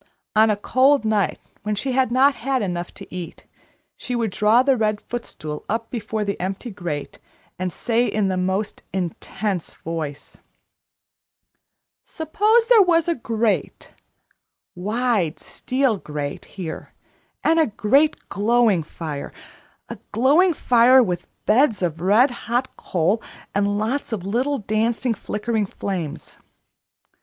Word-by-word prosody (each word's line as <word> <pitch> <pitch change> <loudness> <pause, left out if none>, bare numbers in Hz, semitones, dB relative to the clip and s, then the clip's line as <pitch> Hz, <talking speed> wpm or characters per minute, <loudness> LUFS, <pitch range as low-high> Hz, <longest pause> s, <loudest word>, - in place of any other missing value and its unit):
On 220 +1 +6
a 210 - +3
cold 260 +4 +3
night, 215 -3 +1 0.2
when 210 0 -2
she 265 +6 -2
had 255 -1 +2
not 270 +3 +5
had 260 -1 -1
enough 175 -2 -3
to - - -11
eat, 180 -2 -7 0.5
she 250 - -4
would 230 -4 -1
draw 215 +6 +4
the 270 0 +3
red 215 -3 0
footstool 155 -12 -6
up 225 +2 -2
before 220 -2 -3
the 200 - -3
empty 195 +6 -4
grate, 175 -8 -5 0.4
and 185 -1 -2
say 235 +6 0
in 210 -2 0
the 190 - 0
most 190 +3 -1
intense 190 +1 -3
voice: 155 -3 -6 1.6
"Suppose 425 +9 +1
there 470 -3 +7
was 335 -3 +3
a 340 - +3
grate, 230 -5 -2 0.8
wide 210 -3 0
steel 255 -4 -1
grate 150 -4 -5
here, 175 -5 -8 0.5
and 325 +1 +4
a 320 - +4
great 265 +8 +2
glowing 220 -2 +2
fire 150 -2 -6 0.6
a - - -8
glowing 295 - +4
fire 250 +1 +5
with 180 -4 -3 0.2
beds 220 -3 +3
of 165 -2 -2
red 215 +9 +4
hot 245 +1 -2
coal 185 +6 0 0.3
and 200 0 +1
lots 235 +7 -2
of 200 -5 -3
little 255 +8 0
dancing, 225 +3 0
flickering 210 0 -2
flames. 180 -6 -5
220 Hz, 130 wpm, -22 LUFS, 190-255 Hz, 1.6 s, there